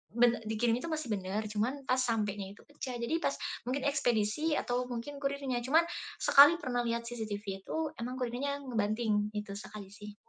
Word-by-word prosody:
be 240 0 +6 0.2
dikirimin 230 +2 +1
itu 335 - -5
masih 310 -6 -3
benar, 195 +2 -2
cuman 235 +7 -1
pas 255 0 +3
sampenya 210 -5 0
itu - - -17
pecah 265 -4 -6
jadi 235 +7 -1
pas - - +1 0.3
mungkin 265 +2 -1
ekspedisi 275 +3 +1
atau 250 +1 0
mungkin 250 +4 -5
kurirnya, 275 -3 -1
cuma 315 +5 +6 0.4
sekali 290 +4 +8
pernah 245 -3 0
lihat 235 0 -1
CCTV 220 -3 -4 0.2
itu - - -3 0.2
emang 250 +2 -3
kurirnya 275 +4 -2
ngebanting, 215 -3 0
itu 210 -1 -4
sekali 205 -2 -9
sih. 205 0 -10
240 Hz, 170 wpm, -32 LUFS, 215-275 Hz, 0.4 s, sekali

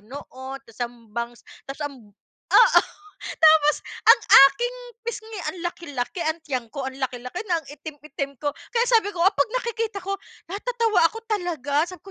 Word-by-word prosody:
noon 260 +3 -9
tapos 230 0 -18
ang 235 -2 -6
bangs 235 +1 -5 0.3
tapos 275 +2 -6
ang 285 -1 -5 0.5
oo - - +7 0.4
tapos 310 -2 +4 0.3
ang - - +8 0.3
aking 485 - -2 0.3
pisngi 445 -2 -6
ang 370 - -11
laki, 345 0 -6
laki 275 +7 -3
ang 315 0 -1
tiyan 255 -6 -3
ko 275 0 -5
ang 265 - -5
laki, 255 -1 -2
laki 250 - -6
na 340 - +3
ang 305 - -23
itim, 295 +1 -10
itim 280 -2 -6
ko, 290 +2 -2 0.2
kaya 475 0 +1
sabi 450 -4 +3
ko 365 - -10
kapag 285 -8 +3
nakikita 455 -3 -3
ko 395 +1 -3 0.3
natatawa 440 0 0
ako 390 +7 +1
talaga 330 - -1
sabi 360 +1 -10
ko - - -10
310 Hz, 180 wpm, -24 LUFS, 265-400 Hz, 0.5 s, ang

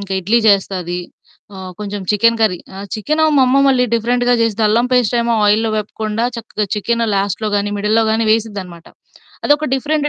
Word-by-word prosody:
ఇంక 200 - -8
ఇడ్లీ 210 +6 +2
జేస్తది. 185 -3 0 0.6
ఆ! - - -10 0.2
కొంచెం 205 -1 -5
చికెన్ 230 +2 +2
కర్రీ 205 -5 +2 0.2
ఆ! - - -8 0.2
చికెను 305 +9 0
మా - - +5
అమ్మ 260 +2 +3
మళ్ళీ 250 -2 +2
డిఫరెంట్‌గా 245 +2 +1
జేస్తది, 225 -1 0
అల్లం 235 +4 +2
పేస్ట్ 245 -1 +2
ఏమో 235 0 0
ఆయిల్లో 220 +2 +2
వేపకుండా 215 +2 -3
చక్కగా 215 -2 -4
చికెను 230 +3 -1
లాస్ట్‌లో 200 +2 -2
గానీ, 205 0 -1
మిడిల్‌లో 215 +2 +1
గానీ 225 0 0
వేసిద్దనమాట. 200 -6 -4 0.6
అదొక 295 +1 +2
డిఫరెంటు 295 +2 -1
220 Hz, 165 wpm, -16 LUFS, 205-235 Hz, 0.6 s, మా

